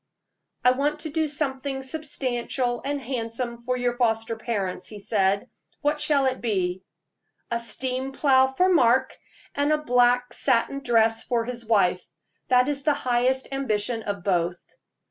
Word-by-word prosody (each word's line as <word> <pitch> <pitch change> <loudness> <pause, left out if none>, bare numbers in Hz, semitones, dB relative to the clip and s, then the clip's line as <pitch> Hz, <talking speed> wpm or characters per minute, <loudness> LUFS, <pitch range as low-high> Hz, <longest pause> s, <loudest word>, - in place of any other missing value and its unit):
"I 250 - +7
want 295 +4 -1
to 310 - -4
do 315 +1 0
something 275 -2 -2
substantial 255 -4 -2
and 285 +1 -2
handsome 235 -1 -4
for 250 0 0
your 245 -1 -1
foster 225 -2 0
parents," 195 -5 -3
he 215 - -8
said. 200 +1 0 0.3
"What 295 +1 0
shall 280 -3 +3
it 260 0 -1
be?" 185 -5 -1 0.7
"A 235 - 0
steam 255 +3 -3
plow 265 -1 +4
for 265 +8 +1
Mark, 260 -3 +3 0.4
and 285 +1 +1
a 305 - +4
black 245 -3 +2
satin 260 +1 +1
dress 225 -3 +2
for 235 -2 -1
his 240 -1 -6
wife 185 -5 +2 0.4
that 250 0 +4
is 285 -1 0
the 295 0 +2
highest 255 0 0
ambition 230 -4 -1
of 200 -3 -4
both." 175 -2 0
250 Hz, 150 wpm, -25 LUFS, 225-270 Hz, 0.7 s, I